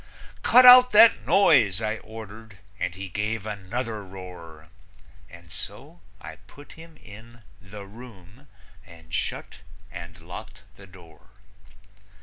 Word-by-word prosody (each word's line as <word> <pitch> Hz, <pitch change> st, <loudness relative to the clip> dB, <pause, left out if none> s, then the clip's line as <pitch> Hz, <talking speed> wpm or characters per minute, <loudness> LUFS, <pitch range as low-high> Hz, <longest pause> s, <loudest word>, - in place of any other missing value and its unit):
"Cut 250 Hz, +1 st, +5 dB
out 250 Hz, -1 st, +9 dB
that 225 Hz, +2 st, +5 dB
noise!" 120 Hz, -, +3 dB
I 110 Hz, 0 st, -3 dB
ordered, 110 Hz, -1 st, -12 dB, 0.2 s
and 90 Hz, -1 st, -4 dB
he 95 Hz, +1 st, -8 dB
gave 105 Hz, +3 st, -4 dB
another 110 Hz, +2 st, -6 dB
roar, 90 Hz, -5 st, -12 dB, 0.6 s
And 85 Hz, -1 st, -16 dB
so -, -, -10 dB, 0.2 s
I -, -, -11 dB
put 145 Hz, 0 st, -17 dB
him 160 Hz, -1 st, -15 dB
in 115 Hz, +2 st, -16 dB, 0.2 s
"the 100 Hz, +1 st, -11 dB
room" 110 Hz, +2 st, -16 dB, 0.4 s
and 85 Hz, -3 st, -18 dB
shut -, -, -5 dB, 0.3 s
and 85 Hz, -2 st, -11 dB
locked 100 Hz, +5 st, -12 dB
the 100 Hz, -1 st, -16 dB
door. 85 Hz, -3 st, -19 dB
100 Hz, 125 wpm, -24 LUFS, 90-115 Hz, 0.6 s, out